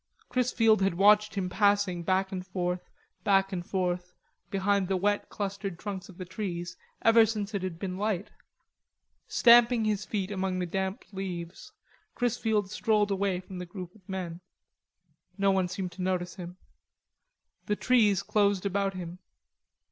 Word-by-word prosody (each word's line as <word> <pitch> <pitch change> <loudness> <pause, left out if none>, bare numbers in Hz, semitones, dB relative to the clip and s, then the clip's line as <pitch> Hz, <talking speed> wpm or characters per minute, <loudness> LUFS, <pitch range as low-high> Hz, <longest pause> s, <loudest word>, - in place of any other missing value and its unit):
Chrisfield 230 -4 +3
had 195 -2 +2
watched 210 +2 +5
him 190 -2 -1
passing 200 -2 +2
back 190 +2 +1
and 185 -1 -4
forth, 180 -1 -3 0.3
back 195 -1 +3
and 175 -2 -2
forth, 180 -1 -2 0.3
behind 195 0 +1
the 190 0 +1
wet 205 +2 0
clustered 195 -2 -4
trunks 195 -1 -6
of 180 - -13
the 185 - -6
trees, 175 -3 -5 0.3
ever 225 0 +7
since 215 -1 -2
it 200 - -1
had 185 -3 -4
been 185 0 -4
light. 205 -2 -1 1.0
Stamping 235 -1 +6
his 210 -1 0
feet 200 -2 -3
among 190 -2 -1
the 180 - -1
damp 190 +2 -3
leaves, 180 -3 -6 0.4
Chrisfield 220 -5 0
strolled 210 -1 +1
away 195 -2 0
from 185 0 -9
the 180 - -5
group 180 -1 -8
of 195 -4 -23
men. 180 -3 -4 1.0
No 195 0 +3
one 190 -1 +2
seemed 185 0 -4
to 180 +2 -8
notice 180 -1 -1
him. 180 0 -9 1.1
The 210 - +1
trees 210 -6 +3
closed 200 -2 +2
about 195 0 0
him. 180 0 -7
195 Hz, 155 wpm, -29 LUFS, 180-205 Hz, 1.1 s, ever